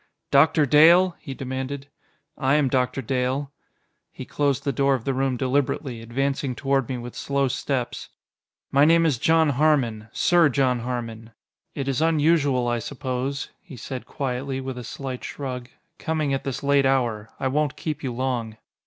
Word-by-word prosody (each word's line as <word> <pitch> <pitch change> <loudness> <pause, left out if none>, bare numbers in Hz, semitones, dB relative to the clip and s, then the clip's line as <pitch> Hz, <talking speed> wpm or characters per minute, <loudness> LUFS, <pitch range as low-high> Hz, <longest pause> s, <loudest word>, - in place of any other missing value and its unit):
"Doctor 150 +2 +5
Dale?" 170 +6 +6
he 135 - -7
demanded. 130 +2 -5 0.5
"I 135 0 +2
am 145 -3 +3
Doctor 125 0 0
Dale." 130 +3 -1 0.6
He - - -8
closed 140 -1 0
the 140 - 0
door 135 +1 +2
of 120 - -6
the 135 - 0
room 130 -1 0
deliberately, 130 -1 -1
advancing 135 +2 -2
toward 135 -1 0
me 130 - -2
with 120 0 -7
slow 140 -1 0
steps. 130 0 -3 0.6
"My 140 +1 +5
name 165 +2 +5
is 145 -8 +1
John 160 +1 +3
Harmon 130 -7 +1
Sir 175 -3 +4
John 130 -2 +1
Harmon. 115 -2 -5 0.4
It 140 - -3
is 135 +1 0
unusual, 150 -5 +2
I 120 0 0
suppose," 135 +2 -4
he 145 -8 -12
said 130 +1 -7
quietly, 135 0 -3
with 130 -1 -5
a - - -7
slight 130 +2 -6
shrug, 125 -3 -6 0.3
"coming 155 -3 -1
at 135 - -2
this 135 -1 -4
late 140 -1 +3
hour. 120 -5 0
I 135 - 0
won't 145 +2 0
keep 155 -2 -4
you 130 - -3
long." 120 -3 -3
135 Hz, 165 wpm, -24 LUFS, 125-145 Hz, 0.6 s, Dale